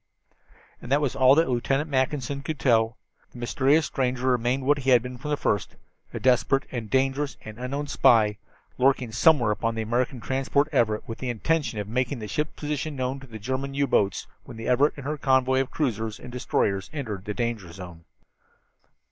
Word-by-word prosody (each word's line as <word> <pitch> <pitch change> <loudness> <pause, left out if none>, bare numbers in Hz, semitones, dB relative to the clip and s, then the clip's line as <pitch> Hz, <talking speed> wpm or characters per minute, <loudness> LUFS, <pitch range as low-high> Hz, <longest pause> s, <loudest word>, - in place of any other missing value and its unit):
And 120 - -9
that 140 - +4
was 145 -4 -1
all 130 +1 +6
that 165 +2 +3
Lieutenant 135 +4 0
Mackinson 140 -1 -1
could 150 +1 -4
tell. 115 -1 +2 0.4
The - - -12
mysterious 135 +6 +2
stranger 130 -2 -1
remained 125 +2 0
what 145 +1 +3
he 135 -1 -1
had 125 -3 +5
been 125 -1 -7
from 150 - -6
the 150 - 0
first 105 - -1 0.4
a - - -5
desperate 130 +1 +3
and 115 -4 -5
dangerous 135 +3 0
and 110 +1 -9
unknown 140 +4 -3
spy, 110 -6 +3 0.4
lurking 130 -2 +2
somewhere 120 -1 +4
upon 115 +2 -1
the 110 - -2
American 120 +3 -1
transport 135 +4 0
Everett 110 -6 +1
with 115 - -6
the 130 - -4
evident 120 -3 -5
intention 150 -9 +1
of 105 -1 -3
making 125 +4 -1
the 110 -2 -6
ship's 150 +9 -2
position 150 0 -3
known 130 +1 -2
to 135 - -13
German 130 +5 -3
U 140 0 +2
boats 100 -7 +1 0.2
when 110 - -11
the 115 0 -6
Everett 135 +4 +3
and 140 - -8
her 150 +1 -3
convoy 130 -1 +3
of 135 - -3
cruisers 115 -7 -2
and 125 - -10
destroyers 100 -5 -1
entered 110 - -5
the 105 -1 -4
danger 115 -7 -3
zone. 85 -2 -10
130 Hz, 195 wpm, -25 LUFS, 115-140 Hz, 0.4 s, all